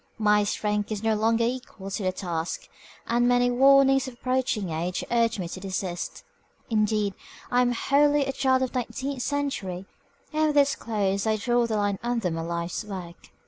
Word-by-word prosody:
My 210 Hz, -1 st, +3 dB
strength 210 Hz, +1 st, -1 dB
is 215 Hz, 0 st, -3 dB
no 225 Hz, 0 st, +2 dB
longer 225 Hz, +2 st, +2 dB
equal 235 Hz, -5 st, -4 dB
to 205 Hz, -, -3 dB
the 185 Hz, -1 st, +1 dB
task, 175 Hz, -3 st, -4 dB, 0.4 s
and 240 Hz, +1 st, +2 dB
many 245 Hz, 0 st, +3 dB
warnings 270 Hz, +1 st, +5 dB
of 255 Hz, -, -8 dB
approaching 250 Hz, -7 st, -1 dB
age 170 Hz, +3 st, -2 dB
urge 230 Hz, -1 st, +2 dB
me 180 Hz, -3 st, -3 dB
to 185 Hz, -, -6 dB
desist. 185 Hz, -2 st, -4 dB, 0.5 s
Indeed, 210 Hz, -2 st, +1 dB, 0.4 s
I 245 Hz, 0 st, +4 dB
am 245 Hz, 0 st, +2 dB
wholly 285 Hz, +3 st, +3 dB
a 270 Hz, -, -1 dB
child 260 Hz, -1 st, +2 dB
of 255 Hz, -, -2 dB
the 255 Hz, -, 0 dB
nineteenth 265 Hz, +2 st, -4 dB
century, 245 Hz, -11 st, -2 dB, 0.5 s
and 310 Hz, 0 st, +2 dB
with 295 Hz, -1 st, 0 dB
its 280 Hz, -1 st, +4 dB
close 200 Hz, -2 st, -1 dB
I 220 Hz, -, +3 dB
draw 240 Hz, +2 st, +1 dB
the 220 Hz, -2 st, -1 dB
line 205 Hz, -1 st, 0 dB
under 235 Hz, -6 st, -1 dB
my 165 Hz, 0 st, -3 dB
life's 170 Hz, +3 st, -3 dB
work. 185 Hz, -5 st, -8 dB
225 Hz, 185 wpm, -26 LUFS, 195-255 Hz, 0.5 s, warnings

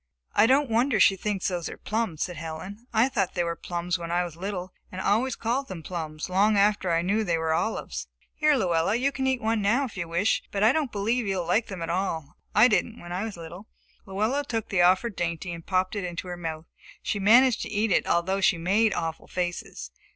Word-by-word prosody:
"I 215 Hz, -, +5 dB
don't 275 Hz, +3 st, +4 dB
wonder 235 Hz, 0 st, +2 dB
she 195 Hz, -, +6 dB
thinks 195 Hz, 0 st, -2 dB
those 175 Hz, -3 st, -2 dB
are -, -, -8 dB
plums," 215 Hz, -8 st, -2 dB
said 180 Hz, -, -5 dB
Helen. 175 Hz, +9 st, -7 dB
"I 225 Hz, +2 st, +4 dB
thought 200 Hz, -8 st, -1 dB
they 175 Hz, -, +1 dB
were 170 Hz, 0 st, -2 dB
plums 175 Hz, +1 st, -3 dB
when 170 Hz, -1 st, -6 dB
I 175 Hz, +1 st, +1 dB
was 175 Hz, -3 st, -7 dB
little 185 Hz, 0 st, -5 dB, 0.2 s
and 185 Hz, -, -6 dB
always 230 Hz, +7 st, +1 dB
called 250 Hz, +4 st, -1 dB
them 175 Hz, -4 st, -7 dB
plums 155 Hz, -3 st, -5 dB
long 200 Hz, +3 st, +3 dB
after 200 Hz, -3 st, +2 dB
I 165 Hz, 0 st, +2 dB
knew 205 Hz, +5 st, +1 dB
they 170 Hz, -5 st, 0 dB
were 160 Hz, 0 st, 0 dB
olives. 220 Hz, +7 st, -2 dB, 0.3 s
Here, 305 Hz, -1 st, +3 dB
Luella, 180 Hz, -4 st, +1 dB
you 265 Hz, +4 st, +1 dB
can 265 Hz, -1 st, -2 dB
eat 260 Hz, -3 st, 0 dB
one 220 Hz, 0 st, +1 dB
now 235 Hz, +8 st, +2 dB
if 245 Hz, -, -9 dB
you 175 Hz, -3 st, -4 dB
wish, 170 Hz, +6 st, +1 dB
but 200 Hz, 0 st, -1 dB
I 220 Hz, -, +7 dB
don't 285 Hz, -3 st, -1 dB
believe 220 Hz, +3 st, 0 dB
you 195 Hz, -1 st, 0 dB
will 175 Hz, -, -2 dB
like 210 Hz, +7 st, +1 dB
them 185 Hz, -4 st, -6 dB
at 165 Hz, -, -2 dB
all. 170 Hz, -5 st, -2 dB, 0.2 s
I 215 Hz, +4 st, +8 dB
didn't 230 Hz, +1 st, 0 dB
when 175 Hz, -, -10 dB
I 185 Hz, +4 st, -2 dB
was 215 Hz, -5 st, -6 dB
little." 170 Hz, +5 st, -10 dB, 0.4 s
Luella 215 Hz, +9 st, 0 dB
took 230 Hz, -5 st, -3 dB
the 185 Hz, -3 st, +2 dB
offered 185 Hz, +5 st, +3 dB
dainty 170 Hz, +1 st, -3 dB
and 165 Hz, 0 st, -8 dB
popped 185 Hz, +2 st, 0 dB
it 200 Hz, -, -2 dB
into 175 Hz, +1 st, -5 dB
her 175 Hz, -, -4 dB
mouth. 165 Hz, -2 st, -5 dB, 0.4 s
She 205 Hz, -, -1 dB
managed 235 Hz, +5 st, +5 dB
to -, -, -4 dB
eat 210 Hz, +1 st, 0 dB
it, -, -, +2 dB
although 190 Hz, +3 st, +1 dB
she 195 Hz, -2 st, +4 dB
made 200 Hz, +6 st, +2 dB
awful 165 Hz, -1 st, -4 dB
faces. 175 Hz, -, -4 dB
195 Hz, 230 wpm, -26 LUFS, 175-220 Hz, 0.4 s, I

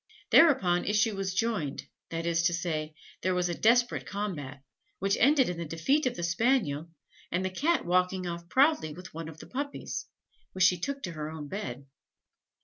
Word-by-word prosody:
Thereupon 195 Hz, -, +5 dB
issue 210 Hz, +1 st, +2 dB
was 190 Hz, -1 st, -3 dB
joined 195 Hz, -10 st, -1 dB, 0.2 s
that 165 Hz, 0 st, -3 dB
is 170 Hz, -1 st, +2 dB
to 175 Hz, -, -1 dB
say, 155 Hz, -3 st, -3 dB, 0.3 s
there 185 Hz, 0 st, +1 dB
was 180 Hz, 0 st, +1 dB
a -, -, -1 dB
desperate 240 Hz, +6 st, +2 dB
combat, 150 Hz, -10 st, -5 dB, 0.3 s
which 195 Hz, +1 st, +1 dB
ended 275 Hz, 0 st, +5 dB
in 180 Hz, -, -3 dB
the 170 Hz, -, -3 dB
defeat 165 Hz, -, +1 dB
of 245 Hz, -, -2 dB
the 175 Hz, -, -5 dB
Spaniel, 170 Hz, -, +1 dB, 0.4 s
and 180 Hz, +2 st, 0 dB
in 190 Hz, -, -3 dB
the -, -, -16 dB
Cat 330 Hz, -, +1 dB
walking 180 Hz, +1 st, +1 dB
off 170 Hz, 0 st, -6 dB
proudly 270 Hz, -, +3 dB
with 180 Hz, +4 st, -11 dB
one 160 Hz, 0 st, -6 dB
of 160 Hz, -, -11 dB
the -, -, -11 dB
puppies, 280 Hz, +2 st, -5 dB, 0.5 s
which 185 Hz, -, +1 dB
she 180 Hz, -2 st, +4 dB
took 280 Hz, +8 st, -4 dB
to 175 Hz, -, -3 dB
her 155 Hz, -2 st, -5 dB
own 155 Hz, -2 st, -7 dB
bed. 140 Hz, -, -5 dB
180 Hz, 190 wpm, -29 LUFS, 165-225 Hz, 0.5 s, Thereupon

